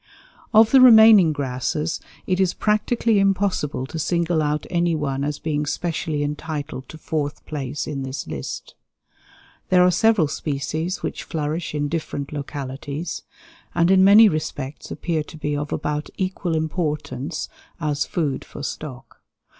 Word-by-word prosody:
Of 220 0 +6
the 265 - +7
remaining 220 -8 +8
grasses 145 +3 -2 0.3
it 185 -1 0
is 190 -2 +2
practically 215 +1 +1
impossible 195 -9 0
to 160 +4 -6
single 170 0 +1
out 150 0 -1
any 170 -1 +2
one 140 -3 -2
as 145 0 -2
being 150 -2 -2
specially 160 -2 -2
entitled 145 -2 -5
to 160 - -9
fourth 150 -2 -3
place 145 -1 -4
in 140 -3 -4
this 130 0 -5
list. - - -6 1.0
There 180 -1 +5
are 180 - +5
several 220 -5 +3
species 155 +5 -3
which - - -3
flourish 155 +1 -3
in 145 0 0
different 145 -3 -4
localities, 140 +2 -5 0.5
and 170 +1 +3
in 190 0 +6
many 210 +3 +8
respects 150 -5 -4
appear 165 -3 -2
to 155 +1 -10
be 150 -1 -2
of 145 +1 -4
about 150 0 -2
equal 185 -3 -2
importance 155 -1 -2 0.3
as 150 -3 0
food 150 -6 -1
for 145 - -10
stock. 135 -3 -7
155 Hz, 145 wpm, -22 LUFS, 145-180 Hz, 1.0 s, remaining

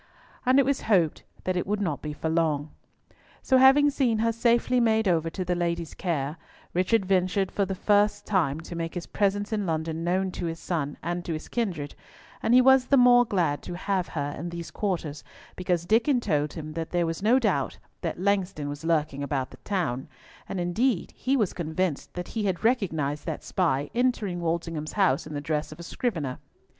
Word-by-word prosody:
And 255 +1 +5
it 275 - +5
was 275 0 0
hoped 175 -7 +3 0.2
that 185 - -1
it 180 - -1
would 205 +1 0
not 165 -8 -2
be 150 - -4
for 150 +2 -4
long. 160 -2 0 0.7
So, 260 - +4
having 280 +2 +6
seen 255 -5 +1
her 230 +1 +2
safely 235 +2 +2
made 220 -2 +3
over 165 -2 +2
to 185 +2 -4
the 180 - +1
lady's 170 -2 -2
care, 155 -4 -2 0.4
Richard 190 +4 +2
ventured 185 0 +1
for 200 - 0
the 190 0 -3
first 205 +2 +2
time 160 -7 +1
to 170 - -8
make 165 +1 -4
his 175 - -4
presence 205 +1 0
in 205 -3 -1
London 160 0 -2
known 185 +2 0
to 175 - -4
his 165 0 -4
son, 145 -5 -3
and 175 +1 -2
to 165 - -2
his 155 - -6
kindred; 175 -12 -2 0.5
and 235 - +3
he 255 - +8
was 265 0 +5
the 275 - +4
more 245 -1 +7
glad 170 -9 0
to 175 - -6
have 190 -1 -1
her 145 -2 -3
in 170 +3 -4
these 170 -1 -7
quarters 170 -8 -3 0.3
because 180 -2 -1
Diccon 235 +7 +3
told 150 -9 0
him 155 -2 -7
that 165 0 -4
there 175 -1 +1
was 165 +1 -3
no 225 +5 +4
doubt - - 0 0.2
that - - -3
Langston 190 -6 0
was 145 +1 -6
lurking 155 -4 0
about 140 -2 -2
the - - -12
town, 140 -11 -2 0.4
and 195 - -3
indeed 185 +5 0
he 270 +2 0
was 210 -7 +1
convinced 165 -1 -2
that 180 0 -5
he 220 -2 -2
had 190 0 -1
recognised 160 - 0
that - - -4
spy 145 -6 0
entering 235 -7 0
Walsingham's 165 -2 -2
house 185 -9 +2
in 155 - -7
the 145 - -3
dress 150 +1 -2
of 155 - -11
a - - -7
scrivener. 165 - -3
175 Hz, 200 wpm, -27 LUFS, 160-210 Hz, 0.7 s, he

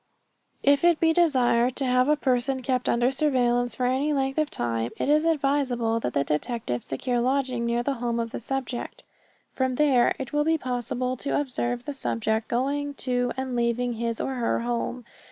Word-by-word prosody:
If 280 +1 +4
it 345 -2 +4
be 325 -1 +3
desired 255 -7 +3
to 275 - -2
have 255 0 +3
a 300 - +5
person 260 -1 0
kept 250 0 0
under 240 +2 +2
surveillance 245 -4 +1
for 250 - -1
any 270 +4 +1
length 270 +1 0
of 305 -1 +1
time, 115 - -1
it - - -1
is 305 +2 +4
advisable 275 -7 +1
that 125 - -3
the 140 - +3
detective 150 - -2
secure 240 - -2
lodging 255 -1 0
near 235 +1 0
the 280 - 0
home 235 -1 -1
of 230 -1 -3
the - - -4
subject. 260 0 -4 0.5
From 260 -1 -1
there 265 -4 +3
it 265 0 -6
will 295 0 +2
be 320 +1 +2
possible 250 -1 -2
to 280 - -1
observe 245 -3 -2
the 290 - -4
subject 220 -4 -1
going 285 +4 -1
to 245 -2 -1
and 260 -1 -3
leaving 240 +1 0
his 230 0 -3
or 270 - -2
her 235 -1 0
home. 240 0 -3
250 Hz, 190 wpm, -26 LUFS, 240-275 Hz, 0.5 s, a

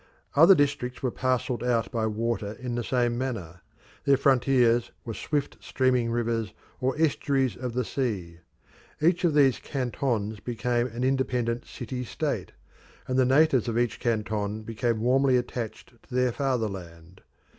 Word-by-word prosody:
Other 165 +6 +8
districts 140 -5 -1
were 130 - +1
parcelled 125 -1 -1
out 120 -2 0
by 115 -3 0
water 110 -1 -2
in 125 +2 -5
the 120 0 -2
same 120 -1 0
manner; 95 -10 -4 0.4
their 140 -1 +4
frontiers 125 -3 +3 0.2
were 115 - -4
swift 145 +5 -2
streaming 125 -3 +1
rivers 115 -2 -1 0.2
or 130 +3 -1
estuaries 140 -4 +1
of 125 -1 -5
the 125 0 -1
sea. 95 -12 -3 0.6
Each 170 +4 +2
of 165 -4 +2
these 135 -4 +4
cantons 120 -5 -2
became 120 +2 -1
an 120 +1 -5
independent 125 -3 0
city 125 +1 -6
state, 115 - -3 0.6
and 130 0 +1
the 130 - +5
natives 135 -2 +4
of 115 -1 -1
each 120 -2 0
canton 110 -2 -1
became 115 0 -1
warmly 130 +2 +3
attached 120 -1 -5
to 125 - -10
their 125 -1 +3
fatherland. 95 - -4
120 Hz, 145 wpm, -27 LUFS, 115-130 Hz, 0.6 s, Other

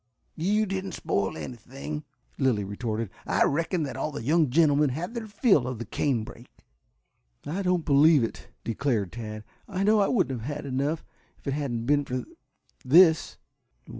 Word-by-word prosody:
"You 205 +6 +1
didn't 190 -1 -4
spoil 100 -9 -1
anything," 135 +5 -7 0.3
Lilly 125 -7 +2
retorted. 110 +1 -3 0.2
"I - - +3
reckon 165 +3 0
that 140 - -4
all - - -2
the 125 - -6
young 155 +2 +3
gentlemen 145 0 +4
had 165 - -4
their 230 -2 -5
fill 205 - +3
of 125 -2 -4
the 120 - -5
canebrake." 120 0 -3 0.8
"I 170 +7 -2
don't 180 -3 +1
believe 145 -1 +5
it," 115 - -5 0.2
declared 115 -5 -1
Tad. 110 -2 -7 0.2
"I 195 -2 -2
know 215 +1 +4
I 200 - +3
wouldn't 135 - 0
have 145 +6 -4
had 150 - -6
enough, 140 +4 -1 0.3
if - - -29
it 140 - -1
hadn't 130 -6 -2
been 145 +2 +3
for 125 -1 -3 0.6
this." 160 +4 +5
145 Hz, 165 wpm, -27 LUFS, 120-170 Hz, 0.8 s, believe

